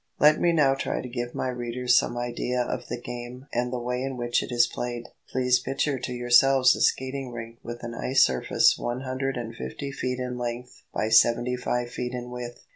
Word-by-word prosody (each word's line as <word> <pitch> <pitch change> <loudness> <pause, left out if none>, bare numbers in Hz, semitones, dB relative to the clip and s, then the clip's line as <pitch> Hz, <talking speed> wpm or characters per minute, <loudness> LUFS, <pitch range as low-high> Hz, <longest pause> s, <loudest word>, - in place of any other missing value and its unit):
Let 150 +1 +5
me 175 - +4
now 150 -5 +4
try 135 - -2
to - - -5
give 120 0 -4
my 130 - -1
readers 125 0 0
some 120 - +2
idea 120 +1 -2
of - - -4
the 120 - -4
game 120 +1 -7
and 120 +1 0
the 125 - -2
way 125 +1 -2
in 135 -1 -3
which 120 0 +1
it - - -6
is 120 0 +5
played. 120 -1 -5 0.2
Please 125 -1 +2
picture 135 +2 -1
to 125 - -4
yourselves 125 +2 +5
a - - -5
skating 130 0 0
rink 115 0 -8
with 120 0 -8
an 120 0 -5
ice 130 +3 +3
surface 65 -1 +2
one 120 +1 -3
hundred 130 0 -2
and 115 -1 -5
fifty 65 - -5
feet 125 -1 -3
in 125 -1 -4
length 120 +1 -5
by 110 - -1
seventy 120 +2 +4
five 120 -1 -2
feet 125 0 -4
in 125 0 -6
width. 120 -1 -7
125 Hz, 210 wpm, -26 LUFS, 120-130 Hz, 0.2 s, Let